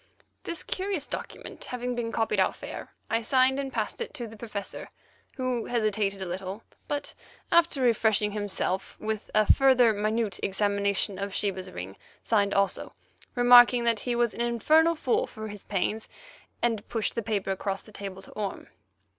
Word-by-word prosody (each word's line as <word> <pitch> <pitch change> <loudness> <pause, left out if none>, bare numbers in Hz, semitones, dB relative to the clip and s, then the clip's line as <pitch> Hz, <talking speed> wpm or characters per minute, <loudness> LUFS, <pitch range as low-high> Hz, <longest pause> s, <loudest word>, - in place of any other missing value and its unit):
This 335 - -3
curious 375 -6 -2
document - - -7
having 250 0 -3
been 235 -1 -3
copied 225 -1 0
out - - +2
fair, - - -7 0.2
I 225 +1 0
signed 260 +3 +3
and 270 -1 -3
passed - - -3
it 470 - -5
to 240 - -4
the 225 0 -10
Professor, 210 -3 -6 0.5
who 255 -3 -1
hesitated 210 -4 0
a - - -4
little, 190 +4 -5 0.2
but, 290 0 -3 0.4
after 335 -5 +4
refreshing 220 -3 +3
himself 200 -2 -2
with 215 -1 -3
a 215 0 +5
further 255 -4 +5
minute 215 +1 -1
examination 200 -1 0
of 200 0 -4
Sheba's 190 -2 -1
ring, 95 - -7 0.3
signed 200 -3 +2
also, 200 0 0 0.4
remarking 245 0 +7
that 230 -2 +2
he 245 +3 -2
was 235 -1 +2
an - - -4
infernal 310 +8 +3
fool 265 -5 +1
for 220 0 -7
his 205 -1 -10
pains, 210 +3 -2 0.5
and 230 -3 0
pushed 225 -2 -1
the 230 - -1
paper 205 -3 -1
across 195 0 -2
the 215 - -15
table 195 -2 -7
to - - -12
Orme. 205 -2 -5
220 Hz, 165 wpm, -28 LUFS, 200-245 Hz, 0.5 s, remarking